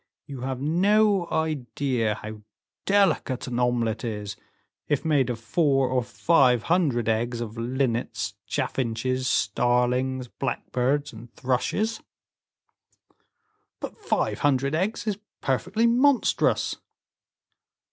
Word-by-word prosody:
You 135 Hz, -3 st, -8 dB
have 130 Hz, 0 st, -3 dB
no 195 Hz, +5 st, +3 dB
idea 130 Hz, -7 st, -1 dB
how 110 Hz, +1 st, -8 dB, 0.5 s
delicate 195 Hz, -10 st, +2 dB
an 125 Hz, -1 st, -3 dB
omelette 120 Hz, -3 st, 0 dB
is, 105 Hz, -3 st, -4 dB, 0.5 s
if 145 Hz, +1 st, 0 dB
made 145 Hz, -5 st, +2 dB
of 120 Hz, -2 st, -3 dB
four 135 Hz, +2 st, +2 dB
or 130 Hz, 0 st, +1 dB
five 125 Hz, -4 st, +3 dB
hundred 145 Hz, -10 st, +1 dB
eggs 115 Hz, +2 st, 0 dB
of 115 Hz, -2 st, -5 dB
linnets, 120 Hz, 0 st, -1 dB
chaffinches, 130 Hz, +1 st, -1 dB
starlings, 125 Hz, +4 st, +1 dB
blackbirds, 135 Hz, +3 st, -2 dB
and 115 Hz, +1 st, -12 dB
thrushes." 135 Hz, -, -1 dB, 1.8 s
"But -, -, -6 dB
five 425 Hz, -, -1 dB
hundred 140 Hz, -1 st, +1 dB
eggs 190 Hz, +7 st, -1 dB
is 210 Hz, -2 st, -2 dB, 0.2 s
perfectly 185 Hz, -, 0 dB
monstrous!" 250 Hz, +3 st, +2 dB
130 Hz, 105 wpm, -25 LUFS, 120-160 Hz, 1.8 s, no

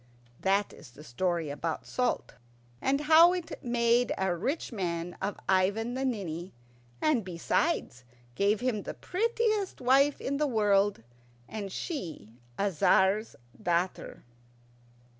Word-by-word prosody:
That 195 Hz, +1 st, +1 dB
is -, -, -13 dB
the 130 Hz, +5 st, -14 dB
story 165 Hz, +3 st, -1 dB
about 160 Hz, +3 st, -4 dB
salt, 250 Hz, 0 st, -1 dB, 0.5 s
and 275 Hz, +2 st, +1 dB
how 325 Hz, +3 st, +7 dB
it 355 Hz, -4 st, -5 dB
made 240 Hz, 0 st, +2 dB
a 190 Hz, -2 st, 0 dB
rich 270 Hz, -, -2 dB
man 175 Hz, -4 st, -3 dB
of 195 Hz, +1 st, -2 dB
Ivan 200 Hz, +5 st, +2 dB
the 260 Hz, +1 st, -2 dB
Ninny, 185 Hz, -8 st, -3 dB, 0.5 s
and 290 Hz, -8 st, +3 dB
besides, 180 Hz, -, -1 dB, 0.3 s
gave 200 Hz, -, +1 dB
him 245 Hz, -5 st, 0 dB
the -, -, -6 dB
prettiest 435 Hz, 0 st, -1 dB
wife 270 Hz, +3 st, +3 dB
in 280 Hz, +1 st, -2 dB
the 300 Hz, 0 st, +1 dB
world, 205 Hz, -, +2 dB, 0.4 s
and 205 Hz, -3 st, -6 dB
she 175 Hz, -, -5 dB, 0.2 s
a 200 Hz, 0 st, +1 dB
Tzar's 190 Hz, +6 st, +3 dB, 0.3 s
daughter. 175 Hz, -1 st, -1 dB
205 Hz, 125 wpm, -29 LUFS, 180-270 Hz, 0.5 s, how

